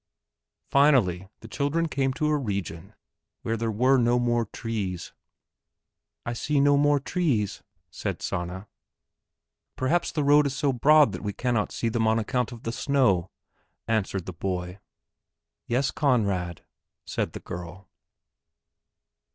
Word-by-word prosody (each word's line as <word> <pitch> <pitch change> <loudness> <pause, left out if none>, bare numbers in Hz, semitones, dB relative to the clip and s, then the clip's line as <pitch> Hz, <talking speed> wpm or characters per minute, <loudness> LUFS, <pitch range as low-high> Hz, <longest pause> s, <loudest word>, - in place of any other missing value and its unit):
Finally 115 - +3
the 115 - -10
children 145 +7 0
came 135 -3 0
to 150 +4 -2
a 150 0 +2
region 100 - -4 0.5
where 115 - -1
there 115 0 -2
were 130 +5 +3
no 120 0 +3
more 120 -1 +1
trees. 100 -6 -4 1.1
"I 120 - -2
see 145 +4 0
no 145 +1 +5
more 145 0 +3
trees," 135 - -1 0.3
said - - -4
Sanna. 95 +2 -4 1.1
"Perhaps 165 +7 0
the 150 -3 0
road 145 +1 +5
is 140 - -4
so 140 -2 +1
broad 150 +1 +5
that 90 - -6
we 105 -1 -3
cannot 120 -3 -1
see 115 - -2
them 115 0 +1
on 110 +1 +3
account 125 +3 -1
of 120 -2 -10
the 115 - -2
snow," 115 -10 +1 0.6
answered 100 -5 -1
the 95 - -6
boy. 90 +1 -4 0.9
"Yes, 130 +4 +1
Conrad," 100 - 0 0.4
said - - -3
the - - -6
girl. 90 +2 -8
115 Hz, 135 wpm, -26 LUFS, 100-140 Hz, 1.1 s, no